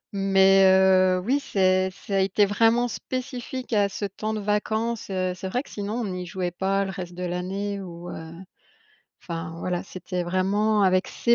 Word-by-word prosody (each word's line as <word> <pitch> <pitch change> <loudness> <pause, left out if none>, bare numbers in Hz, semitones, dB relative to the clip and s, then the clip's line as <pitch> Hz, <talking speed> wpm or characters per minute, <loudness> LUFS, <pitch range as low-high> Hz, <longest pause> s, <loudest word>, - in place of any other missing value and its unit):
Mais 195 0 +5
heu, 190 -1 +5
oui, 270 +5 +2
c'est 190 -8 +2
ça 195 +1 -4
a - - +3
été 195 +2 +3
vraiment 225 +4 +3
spécifique 255 0 -5
à 205 -2 +3
ce 205 - -4
temps 215 +3 -4
de - - -2
vacances, 220 +2 -1
heu, 185 -1 -1
c'est 185 +1 -6
vrai 250 +7 -1
que, - - -17
sinon, 205 +1 -4
on 190 - -4
y 180 0 -4
jouait 180 0 -3
pas 195 +2 0
le 190 - -4
reste 180 -2 -7
de 180 - -5
l'année 190 +3 -3
ou, 175 -1 -8
heu, 160 0 -8 0.9
enfin, 165 -1 -6
voilà, 175 0 -2
c'était 180 0 -5
vraiment 200 +4 +1
avec 185 0 +2
ces 235 - +2
195 Hz, 185 wpm, -25 LUFS, 185-210 Hz, 0.9 s, Mais